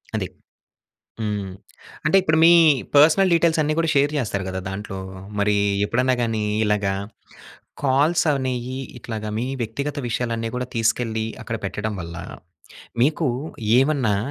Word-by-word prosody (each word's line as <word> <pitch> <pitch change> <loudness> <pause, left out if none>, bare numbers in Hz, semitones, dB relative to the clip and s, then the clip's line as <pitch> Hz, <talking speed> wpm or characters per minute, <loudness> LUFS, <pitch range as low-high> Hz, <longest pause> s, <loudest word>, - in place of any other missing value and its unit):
అది. - - -1 0.9
హ్మ్. 105 -3 -2 0.6
అంటే 155 - +4
ఇప్పుడు 155 -3 +2
మీ 170 - +8 0.4
పర్సనల్ 165 +6 +6
డీటెయిల్స్ 165 -1 +3
అన్ని 155 +1 0
కూడా 165 - +1
షేర్ 145 +2 +3
చేస్తారు 100 -7 -2
కదా! 95 0 -3
దాంట్లో. 95 0 -6 0.4
మరి 105 0 +2 0.3
ఎప్పుడైనా 125 +4 +1
గాని 110 -2 -1 0.2
ఇలాగా 105 -2 +1 0.9
కాల్స్ 145 +5 +3
అనేయి 130 -1 -2 0.2
ఇట్లాగ 110 -3 -6
మీ 120 - -1 0.2
వ్యక్తిగత 140 +6 -3
విషయాలన్నీ 115 -1 -2
కూడా 125 0 -2
తీసుకెళ్లి 115 -1 0 0.2
అక్కడ 115 -1 -4
పెట్టడం 105 +3 -3
వల్ల 85 -1 -7 0.9
మీకు 150 +2 +1 0.5
ఏమన్నా 135 -7 +2
120 Hz, 125 wpm, -22 LUFS, 105-145 Hz, 0.9 s, మీ